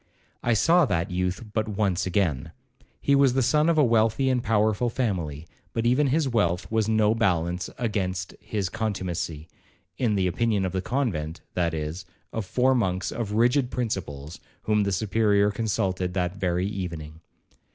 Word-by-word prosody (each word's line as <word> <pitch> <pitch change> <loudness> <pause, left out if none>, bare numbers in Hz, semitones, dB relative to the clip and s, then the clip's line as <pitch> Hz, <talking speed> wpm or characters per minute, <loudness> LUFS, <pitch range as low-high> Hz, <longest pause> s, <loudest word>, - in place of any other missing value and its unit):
I 120 -1 +2
saw 170 +10 +4
that 85 +1 -1
youth 90 +3 -1
but 110 0 0
once 100 -4 0
again. 85 -4 0 0.5
He 140 - +1
was 140 -2 +5
the 130 0 +2
son 150 +6 +3
of 165 - +2
a 150 - +6
wealthy 115 +2 +2
and 125 -1 +1
powerful 110 +2 +2
family, 85 - -2 0.3
but 115 - -1
even 130 +5 +3
his 145 +2 +1
wealth 100 -7 +1
was 110 -1 +1
no 110 -1 +3
balance 90 -5 0
against 95 -6 -2
his 105 -2 -3
contumacy, 90 -7 -3 0.5
in 115 -5 +1
the 95 -2 +1
opinion 100 +2 +1
of 90 - -2
the 95 - -2
convent, 90 - -2
that 85 -2 0
is, 80 +4 -5 0.3
of 110 -4 -3
four 130 +5 +3
monks 95 -7 0
of 110 -3 -4
rigid 125 +4 +3
principles, 85 - -4 0.2
whom 105 -1 +2
the 100 -1 0
Superior 105 +1 +2
consulted 95 -4 -1
that 90 0 -1
very 90 -2 0
evening. 85 -6 -5
100 Hz, 160 wpm, -26 LUFS, 90-115 Hz, 0.5 s, a